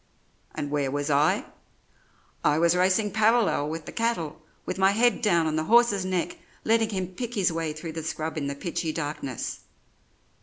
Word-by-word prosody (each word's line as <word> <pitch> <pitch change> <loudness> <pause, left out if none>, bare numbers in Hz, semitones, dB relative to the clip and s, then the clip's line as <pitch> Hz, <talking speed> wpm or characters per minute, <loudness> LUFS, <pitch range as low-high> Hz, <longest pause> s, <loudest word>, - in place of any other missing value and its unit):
"And 145 -1 -4
where 145 -2 0
was 145 +2 -2
I? 145 +2 +3 1.0
I 150 0 +3
was 170 +1 +3
racing 190 +3 +2
parallel 220 -8 +2
with 160 0 -5
the - - -7
cattle, 170 -10 -2 0.2
with - - -4
my 190 +1 +4
head 240 +3 +3
down 170 -7 +3
on 155 0 0
the 155 - -1
horse's 225 -3 +4
neck, 180 -2 -2 0.2
letting 225 0 +2
him 185 -3 -3
pick 240 +4 -5
his 190 -5 +2
way 165 -1 -2
through 155 +2 -6
the 160 0 -5
scrub 160 +1 -4
in 145 -3 -2
the 140 - -3
pitchy 165 +1 -3
darkness. 145 -5 -4
170 Hz, 180 wpm, -26 LUFS, 155-210 Hz, 1.0 s, my